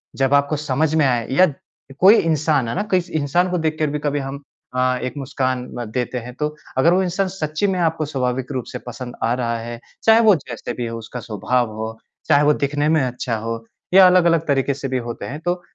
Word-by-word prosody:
जब 135 0 +1
आपको 140 +2 +3
समझ 150 +1 0
में 155 -2 +4
आए 120 -3 +1
या 160 +1 +4 0.5
कोई 195 +4 +8
इंसान 155 - +1
है - - -3
ना, 205 - 0
किस 180 -2 +1
इंसान 160 +3 +1
को 180 - +1
देख 160 -1 -1
के 155 - +2
भी 150 +1 -2
कभी 145 0 -1
हम 135 +1 -6 0.3
अ, 130 0 +2
एक 130 - -3
मुस्कान 130 -2 -2
म 120 - -3
देते 125 +1 -2
हैं 125 +1 -9
तो, 150 +2 -2 0.2
अगर 165 +6 +5
वो 185 - +3
इंसान 185 +2 0
सच्ची 160 0 -2
में 190 -2 0
आपको 160 -2 0
स्वाभाविक 130 -2 -2
रूप 130 -3 -3
से 125 - -6
पसंद 125 0 -7
आ 115 +1 +2
रहा 120 -2 -1
है, 115 +1 -7 0.2
चाहे 225 0 +6
वो 205 - +8
जैसे 130 -6 -6
भी 120 - -4
हो 115 0 -5
उसका 115 +2 -7
स्वभाव 115 +1 -1
हो, 110 0 -5 0.3
चाहे 145 - +5
वो 150 0 +5
दिखने 145 +1 0
में 160 -1 +3
अच्छा 125 -1 -2
हो 115 +1 -5 0.3
या 190 0 +9
अलग-अलग 170 -3 +4
तरीके 140 -1 +1
से 135 0 -5
भी 130 -1 -1
होते 120 - -5
हैं, 145 +3 -6
तो 175 +1 -1
140 Hz, 230 wpm, -21 LUFS, 125-160 Hz, 0.5 s, या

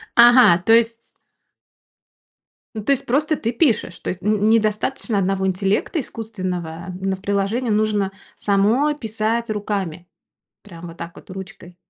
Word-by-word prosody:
Ага! 240 -6 +7
То 225 - +5
есть 230 0 +1 1.6
Ну, 215 - -5
то 250 - +1
есть 275 - +1
просто 300 +5 +1
ты 230 -5 -2
пишешь, 230 - 0
то - - -5
есть 180 - -8
н 210 +2 +1
н 210 +1 +1
недостаточно 220 +1 0
одного 190 0 0
интеллекта 195 - 0
искусственного 185 - -5
на 195 0 -1
приложении. 200 +5 -1
Нужно 210 -2 +1 0.3
самой 220 +9 +2
писать 225 -2 -2
руками, 200 -5 -3 0.6
прямо 175 -4 -11
вот 165 +1 -12
так 170 0 -8
вот - - -14
ручкой. 190 -1 -10
210 Hz, 140 wpm, -21 LUFS, 190-230 Hz, 1.6 s, Ага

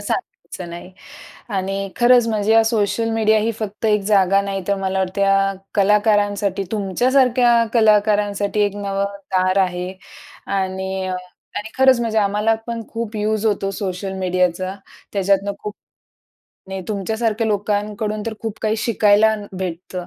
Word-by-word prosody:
सांगायचं 175 -2 -5
नाही. 175 +2 -9 0.6
आणि 195 -1 -2
खरंच 240 -1 +5
म्हणजे 215 0 +1
या 225 0 +6
सोशल 225 0 0
मीडिया 220 -1 +3
ही 225 +2 0
फक्त 215 0 -6
एक 210 -1 +3
जागा 195 -1 +4
नाही, 195 -1 -3
तर 200 - +3
मला 190 0 -1
वाटत 190 +1 -2
या 195 0 +3 0.2
कलाकारांसाठी, 205 -1 +2
तुमच्यासारख्या 245 +5 +3 0.2
कलाकारांसाठी 210 -2 +2
एक 205 0 +1
नवं 200 -1 -2 0.3
दार 185 +1 +2
आहे. 180 0 -3 0.6
आणि 190 0 -2
अ 185 0 -2 0.4
आणि 210 +2 -4
खरंच 265 -2 +5
म्हणजे 225 -2 0
आम्हाला 210 +2 +2
पण 230 -1 -4
खूप 225 -1 -5
यूज 215 +1 0
होतो 195 -2 0
सोशल 190 0 -4
मीडियाचा. 185 0 0 0.4
त्याच्यातुन 200 0 +1
खूप 210 0 -6 0.9
नाही 190 0 -4
तुमच्यासारख्या 220 +2 -1
लोकांकडून 210 +1 -1
तर 220 - -3
खूप 225 -2 -5
काही 215 0 +1
शिकायला 220 -1 +3
न 205 -1 -8
भेटतं. 180 0 -5
205 Hz, 140 wpm, -20 LUFS, 195-220 Hz, 0.9 s, या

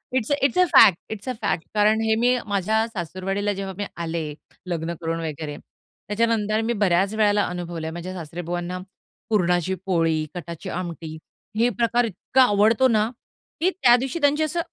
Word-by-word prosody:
It's 255 +2 0 0.3
a 365 - +6
fact, 190 -5 +8
it's 220 +3 -6
a - - -1
fact 170 -5 0
कारण 215 +1 +3
हे 220 0 +2
मी 250 0 +4
माझ्या 215 +2 +1
सासुरवाडीला 195 +1 -3
जेव्हा 195 0 -5
मी 205 - -2 0.2
आले 165 -1 -3 0.4
लग्न 170 -1 -2
करून 165 0 -2
वगैरे, 150 -1 -5
त्याच्यानंतर 215 0 -2
मी 235 - +2
बऱ्याच 190 +2 +2
वेळेला 210 -1 +3
अनुभवलंय. 170 -2 -5
माझ्या 175 +2 -6
सासरेबुवांना 175 +1 -5 0.5
पुरणाची 180 -3 +1
पोळी, 165 -4 +1
कटाची 170 +1 -7
आमटी 170 -3 -5 0.4
हे 235 +2 +4
प्रकार 240 +1 +1
इतका 230 +5 +1
आवडतो 220 +3 +4
ना, 220 -1 +2 0.5
की 350 - +3
त्या 255 -11 +5
दिवशी 265 +6 -3
त्यांची 290 +2 +3
असं 340 +3 -1
200 Hz, 155 wpm, -23 LUFS, 175-225 Hz, 0.5 s, fact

